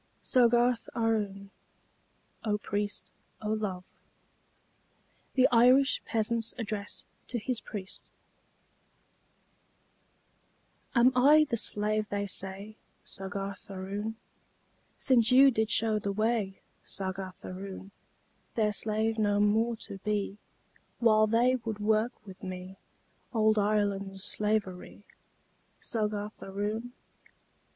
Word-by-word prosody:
SOGGARTH 240 -1 +3
AROON 205 -4 -1 0.9
("O 210 -2 +1
Priest, 205 0 -4 0.3
O 210 - -4
Love!") 195 -4 -3 1.5
THE 260 -1 +6
IRISH 255 +4 +5
PEASANT'S 225 0 0
ADDRESS 210 -3 -5 0.2
TO 245 - -3
HIS 235 +1 -2
PRIEST 195 -3 -7 2.9
Am 245 +1 +6
I 295 +5 +6
the - - +3
slave 215 -1 0
they 200 0 -1
say, 195 +2 -3 0.3
Soggarth 195 +1 -6
Aroon? 200 +3 -4 0.8
Since 235 -3 +4
you 270 +2 +8
did 220 -2 0
show 220 -2 +3
the 200 -1 -2
way, 215 -2 -1 0.2
Soggarth 190 -1 -4
Aroon, 190 +1 -7 0.6
Their 215 -2 +2
slave 220 +2 0
no 205 -1 +2
more 220 +3 +2
to 195 - -8
be, 205 0 -2 0.6
While 215 -2 +4
they 240 +4 +3
would 225 -3 -5
work 215 +3 0
with 190 -2 -12
me 185 0 -7 0.6
Ould 215 -1 +4
Ireland's 200 -2 0
slavery, 210 -3 -1 0.8
Soggarth 210 -2 -3
Aroon? 210 +5 -4
215 Hz, 100 wpm, -30 LUFS, 200-230 Hz, 2.9 s, you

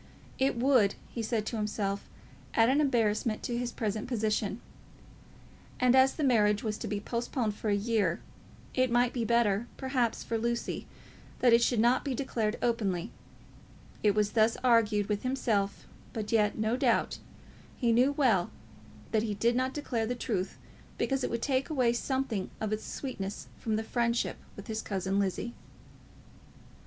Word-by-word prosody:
It 265 -2 +2
would, 245 -5 +4 0.2
he 235 - -4
said 220 -1 -1
to 230 - -3
himself, 205 -2 -2 0.5
add 225 +1 +5
an 280 +3 +3
embarrassment 225 -5 +1
to 240 - -2
his 240 0 -2
present 215 0 -3
position. 215 -2 -1 1.2
And 250 0 +4
as 265 0 +5
the 310 - -2
marriage 210 -6 +3
was 215 -1 -2
to - - -4
be 205 - -2
postponed 235 0 -2
for 210 +1 -3
a 205 - +3
year, 205 -5 +1 0.5
it 255 0 +2
might 240 +1 +2
be 240 - -1
better, 235 -1 +2
perhaps, 260 -4 0
for 230 - -2
Lucy 235 +1 -2 0.5
that 245 -2 +4
it 235 - +6
should 235 -1 +2
not 240 +3 +3
be 275 -3 -2
declared 230 -4 -1
openly. 205 -8 0 0.9
It 205 -2 +3
was 210 -1 +2
thus 225 +1 +4
he - - -9
argued 220 -4 +3
with 205 -1 -1
himself, 220 -6 -1 0.3
but 215 -3 -4
yet, 210 -2 +2
no 220 +2 +1
doubt, 255 - +1 0.6
he 235 -3 +2
knew 250 +4 +4
well 230 -11 +2 0.6
that 220 - +2
he 215 -2 -2
did 235 +4 +2
not 255 +1 +1
declare 245 -6 -2
the 245 - -1
truth 210 -6 -2 0.4
because 270 -1 0
it - - 0
would 235 0 -3
take 270 0 0
away 255 -6 +2
something 240 -5 -2
of 215 -1 -1
its 215 - -3
sweetness 205 -8 -5
from 220 -2 -1
this 220 +1 -2
friendship 235 0 0 0.2
with 200 - -9
his 220 0 -3
cousin 195 0 -1
Lizzie. 200 +4 -1
230 Hz, 170 wpm, -30 LUFS, 210-245 Hz, 1.2 s, it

